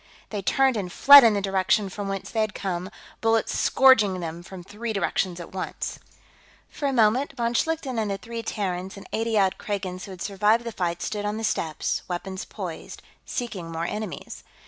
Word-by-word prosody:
They 205 -2 -3
turned 265 +4 +2
and 185 -3 -3
fled 285 +6 +9
in 225 -3 +5
the 200 - -1
direction 195 +2 +2
from 200 +1 -5
whence 195 -1 -4
they 220 - 0
had 215 -1 -1
come, 185 -1 -3 0.3
bullets 225 -1 +1
scourging 220 -8 +5
them 170 0 -5
from 180 +1 -10
three 220 +5 -5
directions 190 -3 -1
at 175 - -9
once. 190 - -5 0.7
For 285 - -2
a - - +1
moment, 245 +3 +3
von 235 0 0
Schlichten 280 -3 -1
and 215 -2 -1
the 195 - -2
three 230 +3 -6
Terrans 190 -4 -3
and 195 - -11
eighty 225 0 0
odd 190 -2 +2
Kragans 190 -3 -4
who 195 - -10
had 185 -1 -7
survived 210 +3 +2
the 235 - -5
fight 175 -4 -2
stood 210 -1 -3
on 210 +1 -2
the 225 - -5
steps, 160 -7 -1
weapons 190 +1 -5
poised, 180 -6 -7 0.2
seeking 195 - -4
more 165 0 -3
enemies. 210 0 -6
205 Hz, 190 wpm, -25 LUFS, 185-225 Hz, 0.7 s, fled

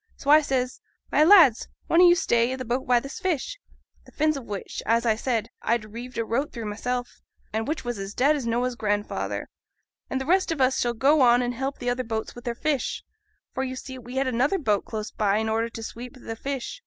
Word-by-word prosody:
So 285 - 0
I 305 +1 +8
says, 260 -3 -2 0.3
"My 300 - +5
lads, 320 - +7 0.2
one 335 - +4
o' 360 - +9
you 345 - +6
stay 235 -7 +2
i' - - -1
th' 255 -2 -7
boat 250 +3 -1
by 245 -1 +5
this 275 +4 -8
fish," 375 - -2 0.4
the - - -18
fins 310 0 +1
o' 275 - -4
which, 205 -5 -6
as 230 +2 +1
I 220 -2 +3
said, 230 -1 -2
I'd 230 -1 0
reeved 245 +2 -8
a 230 - 0
rope 265 +7 -1
through 230 -3 -6
mysel', 245 +4 -2 0.5
and 220 +2 -1
which 310 -2 -3
was 240 -3 -3
as 195 +1 -6
dead 285 +4 +4
as 270 -5 -3
Noah's 245 +2 0
grandfather 205 -2 -2 0.6
"and 265 - -1
th' 265 - -4
rest 370 +3 +2
on 320 - -2
us 260 0 +3
shall 240 -1 0
go 280 +6 +4
off 245 -1 +6
and 245 0 -1
help 270 +3 -3
th' - - -10
other 245 +1 0
boats 220 -2 -4
wi' 240 - -9
their 240 -2 -3
fish." 290 0 -1 0.5
For, 265 - -2
you 260 -1 -4
see, 260 0 -8
we 245 +1 -10
had 270 +1 +1
another 260 +8 +1
boat 210 - 0
close 215 -1 -5
by 205 -1 +1
in 220 +1 -1
order 225 +1 0
to 230 -1 -8
sweep 240 +3 -8
th' 225 -3 -7
fish. 275 - -4
250 Hz, 240 wpm, -25 LUFS, 230-275 Hz, 0.6 s, o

